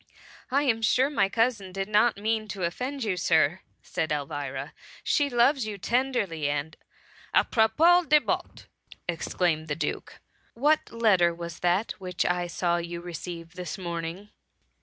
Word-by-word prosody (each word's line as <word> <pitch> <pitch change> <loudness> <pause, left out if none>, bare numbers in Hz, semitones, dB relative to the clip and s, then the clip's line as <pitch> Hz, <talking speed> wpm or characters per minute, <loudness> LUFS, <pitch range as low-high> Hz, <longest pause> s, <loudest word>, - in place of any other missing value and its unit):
*^ - - -32 0.5
I 275 +3 +2
am 230 -5 +1
sure 260 +5 +3
my 195 -9 +2
cousin 225 -3 0
did 195 +1 -3
not 215 +2 +3
mean 215 +1 -1
to 195 -2 -5
offend 255 +10 -3
.you. 205 -4 0
Sir,'' 165 -1 +2 0.2
said 160 -1 -3
Elvira; 140 -1 -4 0.2
" - - -19
She 290 -2 +3
loves 245 0 +3
you 210 -2 -5
tenderly, 200 - 0
and 145 +2 -3 0.3
" - - -14
*^ - - +8
Apropos 330 +10 +4
de 300 +1 +6
bottesT - - -3 0.4
exclaimed 165 -1 -1
the 145 - -2
Duke, 165 - -4 0.4
what 295 +6 +2
letter 190 -7 +3
was 170 -1 -7
that 180 +5 +1
which 180 -2 -2
I 180 0 0
saw 175 0 0
you 170 0 -4
receive 170 0 -7
this 180 0 -6
morning?" 170 +2 -5
185 Hz, 160 wpm, -27 LUFS, 170-230 Hz, 0.5 s, ^